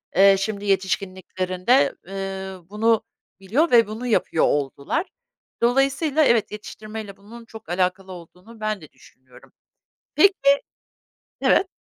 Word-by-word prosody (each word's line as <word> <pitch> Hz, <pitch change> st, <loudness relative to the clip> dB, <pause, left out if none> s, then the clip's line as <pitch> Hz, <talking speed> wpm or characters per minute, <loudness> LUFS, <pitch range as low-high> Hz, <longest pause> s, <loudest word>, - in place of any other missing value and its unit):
eee, 195 Hz, +1 st, +7 dB
şimdi 205 Hz, 0 st, -3 dB
yetişkinliklerinde, 190 Hz, +3 st, 0 dB
ııı, 190 Hz, -2 st, -6 dB
bunu 220 Hz, +1 st, +1 dB, 0.4 s
biliyor 245 Hz, -, +1 dB
ve 230 Hz, -3 st, +6 dB
bunu 225 Hz, +4 st, -6 dB
yapıyor 210 Hz, -7 st, +2 dB
oldular. 140 Hz, -, -1 dB, 0.5 s
Dolayısıyla 275 Hz, +5 st, +2 dB
evet, 235 Hz, -4 st, +2 dB
yetiştirmeyle 215 Hz, -1 st, -8 dB
bunun 230 Hz, +4 st, -13 dB
çok 220 Hz, -6 st, -13 dB
alakalı 185 Hz, +1 st, -1 dB
olduğunu 180 Hz, +6 st, -13 dB
ben 215 Hz, -2 st, -2 dB
de 155 Hz, -, -14 dB
düşünüyorum. 130 Hz, 0 st, -20 dB, 0.6 s
Peki 395 Hz, +7 st, +6 dB, 1.1 s
Evet. 385 Hz, -, +3 dB
200 Hz, 110 wpm, -23 LUFS, 185-230 Hz, 1.1 s, eee